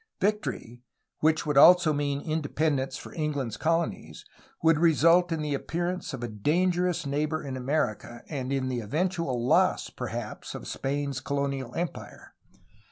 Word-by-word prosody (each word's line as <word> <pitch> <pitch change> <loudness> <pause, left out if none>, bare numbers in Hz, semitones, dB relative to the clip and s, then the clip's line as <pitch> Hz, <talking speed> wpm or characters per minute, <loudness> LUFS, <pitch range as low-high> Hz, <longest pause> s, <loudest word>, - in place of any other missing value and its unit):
Victory, 195 - -2 0.4
which 155 0 +2
would 145 -2 +3
also 175 0 +7
mean 145 -1 -1
independence 145 -3 -1
for - - -10
England's 145 -8 -2
colonies, 165 +4 -2 0.4
would 165 -1 +4
result 170 +2 +4
in 160 -2 -1
the 150 -1 -1
appearance 175 +6 -3
of 130 -3 -6
a - - -1
dan 150 - +1
gerous 180 -2 -1
neighbor 150 +3 -1
in 135 -2 -5
America 125 -3 -2
and 135 -4 -4
in 135 -1 0
the 125 -2 -2
eventual 150 - -1
loss, - - +3
perhaps, - - -6
of - - -7
Spain's 140 -1 -2
colonial 140 -3 -3
empire. 175 0 -6
150 Hz, 145 wpm, -27 LUFS, 135-165 Hz, 0.4 s, also